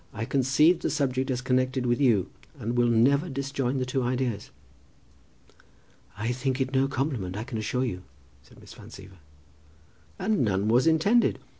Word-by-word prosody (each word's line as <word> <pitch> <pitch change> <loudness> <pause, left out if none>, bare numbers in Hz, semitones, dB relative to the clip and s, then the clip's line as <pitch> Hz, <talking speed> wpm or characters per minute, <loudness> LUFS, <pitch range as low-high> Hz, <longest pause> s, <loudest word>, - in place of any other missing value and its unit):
"I 110 +1 -4
conceived 140 +7 +3
the - - -1
subject 130 -2 -1
as 125 -1 -1
connected 130 0 0
with 120 +3 0
you, 105 -8 +2 0.3
and 115 -3 -4
I - - -3
will 120 0 +3
never 135 +8 +3
disjoin 135 -1 -2
the 130 - -1
two 130 +1 -2
ideas." 125 -4 -2 1.7
"I 115 +3 -2
think 130 +2 -2
it 130 0 -2
no 135 +1 +2
compliment, 130 -9 -3
I 105 - -3
can 115 -2 -5
assure 125 +4 -1
you," 90 -7 -4 0.4
said 65 - -20
Miss - - -14
Van - - -13
Siever. 95 -2 -13 1.0
"And 210 +2 0
none 100 -2 0
was 125 +6 +3
intended. 200 +9 +3
130 Hz, 170 wpm, -26 LUFS, 115-135 Hz, 1.7 s, conceived